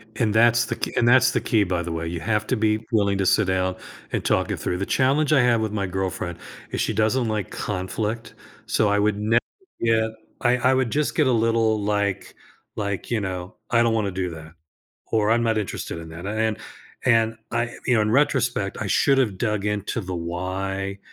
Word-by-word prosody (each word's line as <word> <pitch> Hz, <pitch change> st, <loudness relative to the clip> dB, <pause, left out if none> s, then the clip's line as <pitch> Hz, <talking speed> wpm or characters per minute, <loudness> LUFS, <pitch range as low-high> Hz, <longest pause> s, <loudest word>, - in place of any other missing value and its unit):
And 110 Hz, -4 st, +1 dB
that's 120 Hz, +1 st, +4 dB
the -, -, -3 dB
ke -, -, -4 dB
and 120 Hz, -, +3 dB
that's 130 Hz, +1 st, +6 dB
the -, -, 0 dB
key, 110 Hz, -4 st, +2 dB
by 90 Hz, -2 st, -1 dB
the 85 Hz, -, -5 dB
way, 80 Hz, 0 st, -3 dB
you 85 Hz, 0 st, -4 dB
have 105 Hz, +2 st, -1 dB
to 130 Hz, -, +1 dB
be 110 Hz, 0 st, +1 dB
willing 100 Hz, -3 st, +2 dB
to 95 Hz, -, +1 dB
sit 100 Hz, +2 st, +3 dB
down 95 Hz, 0 st, 0 dB, 0.4 s
and -, -, -1 dB
talk -, -, +1 dB
it -, -, -2 dB
through, 90 Hz, -, -2 dB
the 100 Hz, -, -2 dB
challenge 140 Hz, +6 st, +2 dB
I 135 Hz, -, +5 dB
have 120 Hz, -2 st, +3 dB
with 110 Hz, -, -1 dB
my 105 Hz, -2 st, -1 dB
girlfriend 90 Hz, -2 st, -3 dB, 0.3 s
is -, -, -1 dB
she 110 Hz, -, 0 dB
doesn't 110 Hz, +3 st, +1 dB
like 105 Hz, -4 st, -2 dB
conflict, 105 Hz, +4 st, -3 dB, 0.3 s
so 105 Hz, -2 st, +2 dB
I 105 Hz, -, +2 dB
would 105 Hz, 0 st, +1 dB
never 115 Hz, +3 st, +3 dB, 0.4 s
get 110 Hz, -1 st, +2 dB, 0.3 s
I 125 Hz, 0 st, +3 dB
I 130 Hz, +1 st, +3 dB
would 130 Hz, -3 st, +1 dB
just 150 Hz, 0 st, 0 dB
get 150 Hz, -4 st, +3 dB
a -, -, +3 dB
little 115 Hz, -2 st, +2 dB
like 100 Hz, -2 st, -1 dB, 0.4 s
like, 100 Hz, +2 st, -3 dB
you 115 Hz, -, +2 dB
know, 95 Hz, 0 st, -5 dB, 0.2 s
I 120 Hz, -1 st, +4 dB
don't 115 Hz, -1 st, +2 dB
wanna 105 Hz, -3 st, 0 dB
do 95 Hz, -1 st, -2 dB
that 80 Hz, 0 st, -10 dB, 0.6 s
or 110 Hz, -1 st, +2 dB
I'm 115 Hz, +1 st, +3 dB
not 115 Hz, -1 st, +1 dB
interested 95 Hz, -4 st, -4 dB
in 80 Hz, -, -8 dB
that, 85 Hz, +3 st, -8 dB
a 105 Hz, -, -2 dB
and 110 Hz, 0 st, 0 dB, 0.5 s
and 115 Hz, -2 st, +3 dB, 0.2 s
I, 120 Hz, 0 st, -1 dB, 0.2 s
you 125 Hz, -, +3 dB
know, 110 Hz, -, +3 dB
in 105 Hz, -, 0 dB
retrospect, 120 Hz, -6 st, +1 dB
I -, -, -2 dB
should 140 Hz, -1 st, +3 dB
have 105 Hz, -8 st, +1 dB
dug 105 Hz, -3 st, -1 dB
into 105 Hz, +2 st, -2 dB
the 95 Hz, 0 st, -5 dB
why, 95 Hz, +3 st, -3 dB
110 Hz, 220 wpm, -23 LUFS, 95-115 Hz, 0.6 s, that's